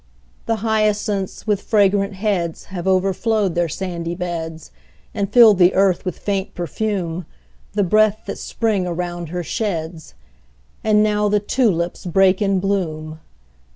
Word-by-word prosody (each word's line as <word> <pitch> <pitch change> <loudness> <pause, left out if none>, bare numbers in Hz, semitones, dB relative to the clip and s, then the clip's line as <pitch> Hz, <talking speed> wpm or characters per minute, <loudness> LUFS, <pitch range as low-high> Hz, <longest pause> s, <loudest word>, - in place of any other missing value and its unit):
The 225 - +2
hyacinths, 210 -3 0
with 205 -2 0
fragrant 200 -1 +2
heads, 190 -5 -2
Have 180 0 -4
overflowed 195 +1 +1
their 170 -1 0
sandy 170 0 -4
beds, 165 -3 -5 0.4
And 200 -2 -2
fill 230 -2 +8
the 180 -1 +4
earth 190 -1 +2
with 185 - -3
faint 200 0 -3
perfume, 175 -1 -3 0.5
The 205 0 +1
breath 215 +3 +3
that 200 - -5
Spring 210 -6 -1
around 175 -1 -4
her 175 +1 -3
sheds. 165 -5 -4 0.7
And 210 -1 +4
now 210 -1 +1
the 210 0 +3
tulips 195 -6 0
break 190 +2 +3
in 195 -2 +2
bloom! 160 -5 -2
190 Hz, 135 wpm, -20 LUFS, 175-210 Hz, 0.7 s, fill